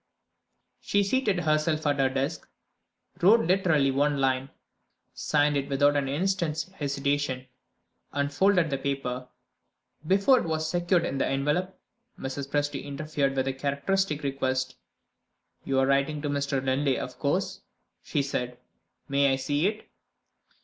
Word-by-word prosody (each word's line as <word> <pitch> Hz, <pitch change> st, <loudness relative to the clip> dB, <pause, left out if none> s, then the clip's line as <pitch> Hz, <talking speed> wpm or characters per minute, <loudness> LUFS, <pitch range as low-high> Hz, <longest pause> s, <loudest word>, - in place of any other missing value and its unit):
She 200 Hz, 0 st, +1 dB
seated 205 Hz, -4 st, +1 dB
herself 155 Hz, 0 st, +1 dB
at 145 Hz, -1 st, +1 dB
her 135 Hz, -1 st, +3 dB
desk; 135 Hz, +1 st, -3 dB, 0.7 s
wrote 215 Hz, +6 st, +6 dB
literally 165 Hz, -6 st, +3 dB
one 145 Hz, +2 st, +1 dB
line; 135 Hz, 0 st, +1 dB, 0.6 s
signed 145 Hz, -1 st, +1 dB
it 140 Hz, 0 st, -1 dB
without 145 Hz, +1 st, +3 dB
an 140 Hz, -1 st, +1 dB
instant's 160 Hz, +1 st, 0 dB
hesitation, 140 Hz, -4 st, -1 dB, 0.7 s
and 145 Hz, 0 st, -1 dB
folded 180 Hz, -1 st, +3 dB
the 135 Hz, -, -1 dB
paper. 130 Hz, -2 st, -3 dB, 0.8 s
Before 200 Hz, +8 st, +5 dB
it -, -, -3 dB
was 160 Hz, -1 st, -1 dB
secured 175 Hz, +1 st, +1 dB
in 135 Hz, -, -2 dB
the -, -, +1 dB
envelope, 150 Hz, +8 st, -1 dB, 0.4 s
Mrs. 135 Hz, +1 st, -5 dB
Presty 145 Hz, +1 st, -1 dB
interfered 145 Hz, -1 st, -2 dB
with 130 Hz, 0 st, 0 dB
a 135 Hz, -, 0 dB
characteristic 145 Hz, +4 st, -1 dB
request. 130 Hz, -1 st, -1 dB, 0.9 s
"You 135 Hz, -, 0 dB
are 135 Hz, -, +4 dB
writing 140 Hz, +2 st, +1 dB
to 145 Hz, -, -1 dB
Mr. 140 Hz, -2 st, -1 dB
Linley, 135 Hz, +1 st, +1 dB
of -, -, -6 dB
course," -, -, -1 dB, 0.4 s
she 145 Hz, -, -1 dB
said. 125 Hz, -3 st, -3 dB, 0.5 s
"May 140 Hz, 0 st, +3 dB
I -, -, +3 dB
see 145 Hz, +5 st, 0 dB
it?" 215 Hz, +1 st, -4 dB
145 Hz, 140 wpm, -27 LUFS, 135-160 Hz, 0.9 s, wrote